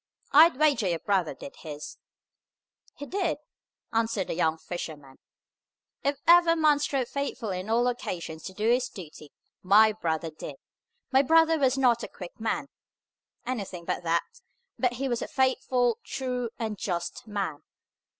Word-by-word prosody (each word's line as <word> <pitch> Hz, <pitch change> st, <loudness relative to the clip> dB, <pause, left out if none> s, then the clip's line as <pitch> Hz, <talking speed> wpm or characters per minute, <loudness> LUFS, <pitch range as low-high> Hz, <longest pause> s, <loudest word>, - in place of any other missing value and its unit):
I'd 315 Hz, 0 st, +7 dB
wager 285 Hz, -9 st, +3 dB
your 170 Hz, -2 st, +1 dB
brother 185 Hz, -1 st, 0 dB
did 280 Hz, -, -10 dB
his!" 150 Hz, -2 st, -8 dB, 1.0 s
"He 285 Hz, -, -7 dB
did!" 360 Hz, 0 st, -1 dB, 0.6 s
answered 225 Hz, -4 st, 0 dB
the -, -, 0 dB
young 160 Hz, -1 st, +1 dB
fisherman. 155 Hz, -5 st, -7 dB, 0.8 s
"If 280 Hz, 0 st, +1 dB
ever 340 Hz, -1 st, +7 dB
man 305 Hz, -3 st, +4 dB
strove 275 Hz, -4 st, -1 dB
faithfully 230 Hz, -9 st, -3 dB
on 185 Hz, +4 st, -7 dB
all 240 Hz, +2 st, +3 dB
occasions 170 Hz, -9 st, -4 dB
to 190 Hz, -, -6 dB
do 215 Hz, +2 st, -1 dB
his 250 Hz, +1 st, +2 dB
duty, 155 Hz, -5 st, -11 dB, 0.3 s
my 210 Hz, +3 st, +6 dB
brother 165 Hz, -5 st, -2 dB
did. 155 Hz, -2 st, -8 dB, 0.6 s
My 265 Hz, 0 st, +6 dB
brother 325 Hz, +3 st, +4 dB
was 265 Hz, -1 st, +2 dB
not 245 Hz, -3 st, +3 dB
a -, -, -4 dB
quick 180 Hz, +2 st, -11 dB
man 270 Hz, +6 st, -1 dB, 0.8 s
(anything 195 Hz, -8 st, -4 dB
but -, -, -2 dB
that), 170 Hz, 0 st, +1 dB, 0.6 s
but 250 Hz, -1 st, +2 dB
he 270 Hz, +3 st, -2 dB
was 240 Hz, -2 st, -1 dB
a -, -, -3 dB
faithful, 255 Hz, -2 st, +1 dB
true, 250 Hz, -3 st, -3 dB
and 220 Hz, -4 st, -4 dB
just 175 Hz, +5 st, -3 dB
man. 195 Hz, -8 st, -3 dB
230 Hz, 150 wpm, -27 LUFS, 175-270 Hz, 1.0 s, I'd